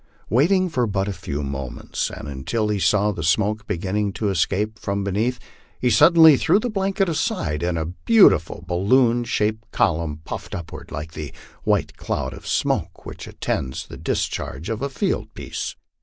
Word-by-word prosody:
Waiting 185 - +4
but 165 - -10
for 120 -7 0
a 100 +1 -2
few 75 -5 -4
moments, 70 -2 -4
and - - -8
until 90 - -2
he 105 -1 0
saw 105 +2 +3
the 90 - -5
smoke 105 +6 +1
beginning 100 +1 -1
to 105 0 -1
escape 100 +4 0
from 100 0 -2
beneath, 110 +6 0 0.4
he 125 - +2
suddenly 160 0 +7
threw 165 +7 +3
the 235 +3 -1
blanket 195 -1 0
aside, 100 - -1
and 85 -1 0
a 80 - -1
beautiful 90 - +4
balloon 120 +7 +3
shaped 110 0 -1
column 80 -4 0
puffed - - -6
upward, 85 -2 -8
like 75 +3 -5
the 75 -3 -6 0.3
white - - +1
cloud - - -3
of - - -11
smoke - - -1
which - - -8
attends 65 -1 -3
the - - -10
discharge 80 - -3
of 110 - -3
a 140 - -1
field 135 - -2
piece. - - -5
105 Hz, 170 wpm, -22 LUFS, 85-125 Hz, 0.4 s, suddenly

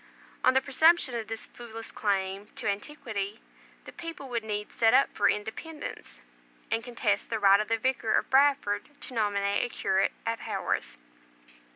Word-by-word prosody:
On 255 - +5
the 265 - +5
presumption 300 +1 +4
of 230 -2 -3
this 225 -1 -4
foolish 225 -1 -9
claim 195 -1 -1
to - - -4
antiquity, 205 -2 -3 0.5
the - - -9
people 330 -5 -8
would 235 -2 -2
needs 210 -1 -4
set 225 +1 +4
up 275 - +4
for - - +3
independence, 220 - -5 0.5
and 225 - 0
contest 230 -4 -1
the 225 - 0
right 200 -1 +6
of 215 - -1
the 225 - +1
Vicar 235 -2 0
of - - 0
Bradford 270 -7 +3
to 260 - -7
nominate 200 -3 +1
a 245 - -2
curate 190 -3 +1
at 230 0 -1
Haworth." - - -3
225 Hz, 165 wpm, -29 LUFS, 205-260 Hz, 0.5 s, right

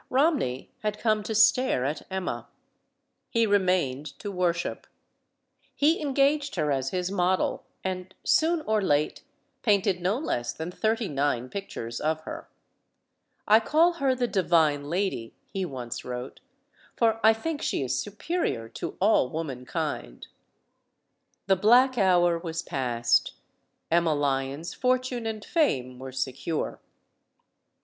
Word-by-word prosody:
Romney 265 - +1
had 210 -1 -2
come 215 -2 +1
to 215 +1 -4
stare 220 - +4
at 145 +2 -2
Emma. 190 -1 -3 0.8
He 230 -1 +2
remained 180 -9 +1
to 205 - -5
worship. 175 -2 -1 0.9
He 310 +4 +3
engaged 285 0 +1
her 150 -4 0
as 135 -1 0
his 180 +2 -2
model, 185 -1 0 0.2
and, 185 0 -4
soon 325 +1 +3
or 220 -6 +1
late, 150 -5 +1 0.4
painted 200 -4 +2
no 190 +6 +1
less 120 - -2
than 160 +2 -5
thirty 220 +3 0
nine 135 -4 -1
pictures 120 -12 -5
of 155 +1 0
her. - - -8 1.0
"I 215 +1 +7
call 320 +9 +3
her 265 -2 +3
'The 245 -1 0
Divine 160 -8 +2
Lady,' 175 - -2
" - - -43
he 195 -2 -1
once 125 -7 -6
wrote. 125 +1 -6 0.6
"For 225 -1 +2
I 220 - +8
think 295 +7 -4
she - - -1
is 130 0 -1
superior 205 - -2
to - - -6
all 195 -10 +3
womankind." 125 - -4 1.2
The 190 - +4
black 245 +6 +5
hour 175 -3 +4
was 165 0 -4
past. 120 -3 +1 0.6
Emma 170 -2 +3
Lyon's 140 +3 -1
fortune 255 -2 0
and 215 -2 -5
fame 130 - 0
were 130 0 -7
secure. 130 +4 -3
185 Hz, 130 wpm, -27 LUFS, 140-225 Hz, 1.2 s, I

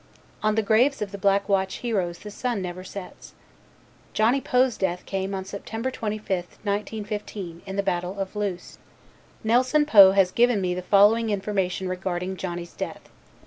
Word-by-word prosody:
On 215 0 +1
the 220 - +2
graves 245 +7 +3
of 200 - -7
the 200 - -7
Black 200 0 +2
Watch 190 -2 +1
heroes 190 -8 -1
the 210 +3 -9
sun 240 0 -2
never 185 0 -5
sets. 190 0 -10 0.8
Johnny 235 +6 +3
Poe's 250 -1 +2
death 180 -2 -2
came 195 0 -3
on 190 0 -4
September 225 +5 -4
25th, 210 -6 -3
1915, 205 -3 -4
in 190 - -5
the 200 - 0
Battle 180 0 -2
of 195 +1 -4
Loos. 200 -4 -4 0.6
Nelson 255 +7 +3
Poe 200 -9 +8
has 195 -2 +3
given 240 -1 +3
me 180 -2 0
the 180 - -3
following 210 +4 +4
information 195 -2 -1
regarding 185 0 -3
Johnny's 175 -2 -5
death. - - -6
200 Hz, 160 wpm, -25 LUFS, 185-220 Hz, 0.8 s, Poe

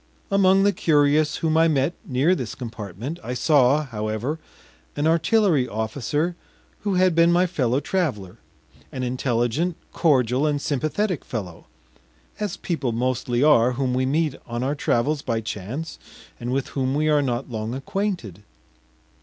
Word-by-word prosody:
Among 195 0 +4
the 205 0 +3
curious 150 -2 +3
whom 160 -1 0
I 165 0 +5
met 145 +1 +1
near 140 +7 +2
this 125 -11 -4
compartment 115 - -6
I 125 - -4
saw, 145 +1 +4
however, 110 +5 -3 0.6
an 145 - -1
artillery 165 - +3
officer 135 +10 -2 0.4
who 205 -2 -1
had 185 -1 +4
been 170 +1 +4
my 175 +1 +4
fellow 130 -7 0
traveler, 135 - -2 0.5
an 130 - -4
intelligent, 125 +6 0 0.2
cordial, 130 -3 +2
and 145 -1 0
sympathetic 155 +6 -1
fellow 95 -8 -6 0.7
as 210 -4 -3
people 145 -8 -2
mostly 125 +1 0
are 125 -5 +5
whom 130 0 -1
we 130 +1 +1
meet 150 +1 +1
on 120 +1 -3
our 135 +2 0
travels 145 +1 0
by 115 -5 -1
chance 115 - -6 0.4
and 120 +1 -4
with 135 0 -1
whom 135 0 -1
we 155 +1 +1
are 150 -1 +4
not 125 -1 -2
long 110 +1 -3
acquainted. 175 - -3
140 Hz, 145 wpm, -23 LUFS, 120-165 Hz, 0.7 s, I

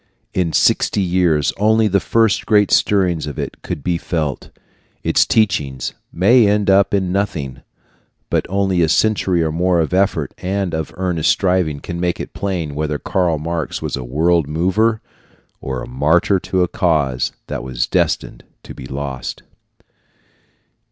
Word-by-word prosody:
In 90 -3 0
sixty 100 - +2
years 90 -5 +1
only 110 +2 +3
the 100 -1 +2
first 115 -1 +1
great 105 -2 +3
stirrings 90 -6 +2
of 75 - -6
it - - -5
could 70 - -5
be 85 +1 0
felt. 75 -7 -3 0.5
Its - - +3
teachings 75 - 0 0.2
may 110 +6 +4
end 105 -1 +2 0.2
in 95 -3 0
nothing, 85 -9 -2 0.7
but - - 0
only 95 -2 +1
a 80 - +2
century 95 -3 +2
or 80 - -1
more 90 +2 +1
of 80 +1 -1
effort 95 +1 +1
and 95 0 -2
of 80 -1 -3
earnest 90 -4 0
striving 90 -6 +1
can 85 +3 -6
make 90 0 -1
it - - -7
plain 90 -7 -3
whether 75 0 -2
Karl 85 0 0
Marx 80 +1 -3
was - - -3
a 65 - -5
world 80 +5 +1
mover 95 +8 +1 0.6
or 65 -2 -4
a - - -8
martyr 80 +9 +2
to 95 0 0
a - - +1
cause 75 -9 0
that - - -5
was 65 -1 -2
destined - - -1 0.2
to - - -10
be 65 - -10
lost. 65 -2 -5
85 Hz, 155 wpm, -18 LUFS, 75-95 Hz, 0.7 s, may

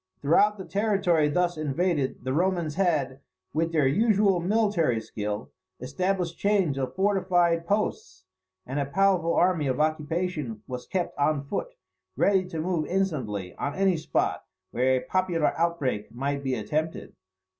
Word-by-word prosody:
Throughout 205 +8 +4
the 190 - -7
territory 185 -4 +2
thus 175 +1 0
invaded, 155 -2 -1
the 130 +1 -2
Romans 175 -1 0
had, 150 -8 0 0.3
with 165 +1 0
their 155 -4 +2
usual 200 - +3
military 180 - +1
skill, 105 -1 -5 0.3
established 175 +6 -2
chains 200 -8 +2
of 130 - -3
fortified 180 -4 +2
posts; 95 - -2 0.4
and 135 +3 -3
a 140 - 0
powerful 180 0 +2
army 175 -5 +2
of 130 +1 -1
occupation 155 - -1
was 125 -1 -7
kept 185 -3 -2
on 145 0 +1
foot, - - -4 0.4
ready 190 -2 +2
to 165 -3 -5
move 165 -2 -1
instantly 130 - -2
on 140 +1 -3
any 195 -1 +2
spot 155 - -1 0.3
where 130 +2 +2
a - - -4
popular 180 -4 +1
outbreak 145 -11 -1
might 140 +4 -3
be 130 -1 0
attempted. 155 +9 -3
165 Hz, 145 wpm, -26 LUFS, 140-185 Hz, 0.4 s, Throughout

